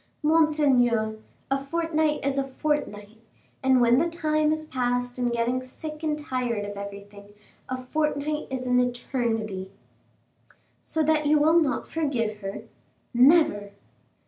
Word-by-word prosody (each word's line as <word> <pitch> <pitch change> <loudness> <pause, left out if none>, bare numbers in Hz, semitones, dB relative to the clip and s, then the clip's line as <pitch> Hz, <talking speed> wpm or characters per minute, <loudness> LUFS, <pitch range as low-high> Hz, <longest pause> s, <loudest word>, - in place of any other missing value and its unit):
"Monseigneur, 270 -9 +3 0.3
a 275 - +2
fortnight 315 -1 0
is 275 0 0
a - - +1
fortnight; 260 -7 -3 0.4
and 265 -1 +4
when 240 +1 +5
the 335 +2 +1
time 310 -2 +1
is 310 0 -2
passed 245 -2 -2
in 245 -1 +1
getting 240 +2 0
sick 305 +4 -8
and 305 -2 -1
tired 250 -7 -2
of 205 0 -6
everything, 200 0 -9 0.4
a 255 - -2
fortnight 300 +3 -2
is 260 -1 -4
an 250 0 +3
eternity." 230 -6 -2 1.1
"So 320 - -1
that 305 -1 +2
you 305 +1 +5
will 315 +3 +5
not 290 -4 -1
forgive 245 -9 -1
her?" 195 -1 -6 0.5
"Never!" 245 -6 +4
260 Hz, 135 wpm, -26 LUFS, 235-305 Hz, 1.1 s, when